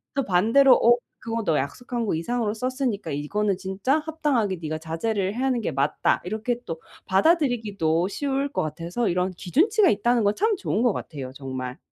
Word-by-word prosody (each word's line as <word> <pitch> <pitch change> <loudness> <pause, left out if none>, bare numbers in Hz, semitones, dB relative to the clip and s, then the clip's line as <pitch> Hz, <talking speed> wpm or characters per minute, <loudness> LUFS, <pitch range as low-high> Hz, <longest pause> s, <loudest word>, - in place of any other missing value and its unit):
또 275 - 0
반대로 225 +9 +5
"어 240 +1 +5 0.2
그거 230 0 -3
너 160 -2 +2
약속한 235 - -3
거 195 - 0
이상으로 215 +5 -1
썼으니까 250 - -2
이거는 190 +7 -1
진짜 195 +9 0
합당하게 295 - -1
니가 155 0 -3
자제를 190 +5 -2
해야 265 +2 0
하는 250 -2 +1
게 165 - -2
맞다." 140 +2 +1
이렇게 220 +5 -2
또 165 -2 -5 0.3
받아 315 - +4
들이기도 200 - 0
쉬울 275 +4 -1
것 - - -1
같아서 170 +9 -2
이런 180 +1 0
기준치가 370 - +3
있다는 235 +2 +2
건 205 +1 +2
참 435 +1 +2
좋은 225 - -1
것 240 -5 +3
같아요, 135 -4 -6
정말. 130 -2 -6
210 Hz, 385 characters per minute, -24 LUFS, 170-250 Hz, 0.3 s, 반대로